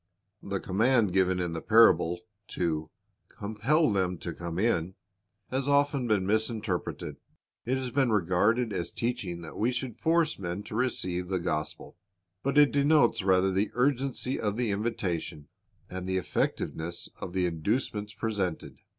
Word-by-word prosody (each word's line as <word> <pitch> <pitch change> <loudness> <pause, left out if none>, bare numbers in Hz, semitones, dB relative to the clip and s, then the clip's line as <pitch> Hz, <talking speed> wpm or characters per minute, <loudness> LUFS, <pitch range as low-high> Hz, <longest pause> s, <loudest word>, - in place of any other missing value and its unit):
The 100 -1 -3
command 110 +1 +2
given 95 -1 +2
in 90 -2 -2
the 80 - -4
parable, 90 -6 +5 0.3
to 80 -3 -2 0.4
"compel 110 +7 +1
them 90 -2 0
to 85 +1 -5
come 85 +1 -6
in," 95 -4 +1 0.6
has 135 +1 -1
often 140 -2 +2
been 105 -4 +2
misinterpreted. 110 -3 -1 0.5
It 130 +2 +1
has 130 -1 -3
been 130 -2 +2
regarded 105 +5 +2
as 85 - -2
teaching 100 -8 -3
that 80 - -9
we 115 +4 +2
should 125 -2 -4
force 165 -5 +2
men 90 +2 -4
to 105 - -8
receive 90 -7 -1
the 95 0 0
gospel. 75 -2 -4 0.4
But 140 +2 -1
it 145 -1 +7
denotes 140 -5 +4
rather 95 0 +3
the 100 +3 +1
urgency 130 0 0
of 105 -1 -1
the 120 -4 0
invitation, 90 -8 -3 0.4
and 90 0 -6
the 95 - +1
effectiveness 85 -1 -2
of 90 - -6
the 95 -1 +1
inducements 105 +5 -1
presented. 100 -7 -3
105 Hz, 150 wpm, -29 LUFS, 90-125 Hz, 0.6 s, it